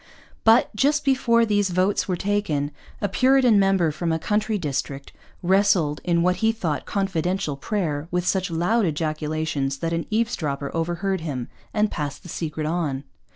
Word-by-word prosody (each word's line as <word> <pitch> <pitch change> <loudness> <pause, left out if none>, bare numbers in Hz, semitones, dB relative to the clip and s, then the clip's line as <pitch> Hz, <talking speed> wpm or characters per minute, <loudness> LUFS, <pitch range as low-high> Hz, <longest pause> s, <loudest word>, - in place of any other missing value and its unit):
But, 225 0 +4
just 290 +6 +2
before 240 -4 +3
these 205 -2 +1
votes 185 +3 +1
were 185 - 0
taken, 175 -7 -1 0.3
a 205 - +1
Puritan 255 +1 +4
member 195 -4 +3
from 165 +2 -2
a 160 - +1
country 210 +5 0
district 140 -4 -4 0.3
wrestled 180 -5 +2
in 170 -1 +2
what 180 0 +2
he 220 +3 +2
thought 165 - -3
confidential 190 -4 -1
prayer 155 -2 -2
with 180 0 -1
such 190 +1 0
loud 180 +7 +1
ejaculations 155 -2 -2
that 165 +3 -2
an 165 0 -2
eavesdropper 170 - -1
overheard 175 +3 -1
him 135 -7 -4 0.2
and 210 0 +1
passed 145 -2 -4
the 175 - -11
secret 155 -1 -4
on. 155 -4 -1
175 Hz, 155 wpm, -24 LUFS, 155-205 Hz, 0.3 s, But